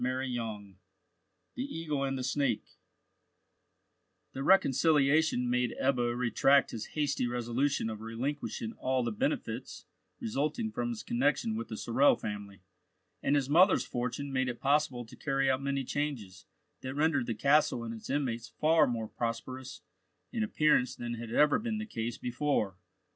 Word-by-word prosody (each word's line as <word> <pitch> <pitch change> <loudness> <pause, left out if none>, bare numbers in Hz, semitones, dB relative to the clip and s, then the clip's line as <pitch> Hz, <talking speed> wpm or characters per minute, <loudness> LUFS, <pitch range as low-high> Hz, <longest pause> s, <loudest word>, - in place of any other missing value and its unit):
CHAPTER 130 +1 0
XVI 110 -5 -4 0.8
THE 260 -6 -5
EAGLE 150 -4 -2
AND 135 0 -2
THE 130 - -3
SNAKE 130 -3 0 1.7
THE 135 - -5
reconciliation 145 -4 +4
made 125 -1 0
Ebbo 120 -3 +1
retract 130 +3 +3
his 115 -2 -7
hasty 145 -4 +1
resolution 120 +2 0
of 110 -1 -5
relinquishing 115 0 -4
all 130 -1 +1
the - - -1
benefits 275 +7 -3 0.3
resulting 220 - -1
from 120 - -2
his 110 -3 -5
connection 120 -3 +1
with 115 +1 -4
the 110 - -6
Sorel 130 +7 +4
family, 100 -2 -7 0.6
and 145 - +2
his 140 -3 +1
mother's 180 +7 +5
fortune 125 +3 -3
made 130 -1 +1
it 120 - -5
possible 140 -3 +1
to 110 - -13
carry 135 -2 +1
out 130 +1 -1
many 140 0 -1
changes 125 -11 -4 0.3
that 130 +1 -5
rendered 145 -4 +2
the 115 - -1
castle 140 0 +3
and 115 0 -5
its 110 - -9
inmates 125 -5 -1
far 155 -1 +3
more 115 -3 -2
prosperous 120 +3 -5 0.5
in 235 - -1
appearance 155 - +2
than 120 0 -4
had 115 -1 -6
ever 150 +4 +4
been 220 -1 -2
the 215 - -3
case 115 - -4
before. 125 -6 -1
130 Hz, 155 wpm, -31 LUFS, 120-145 Hz, 1.7 s, mother's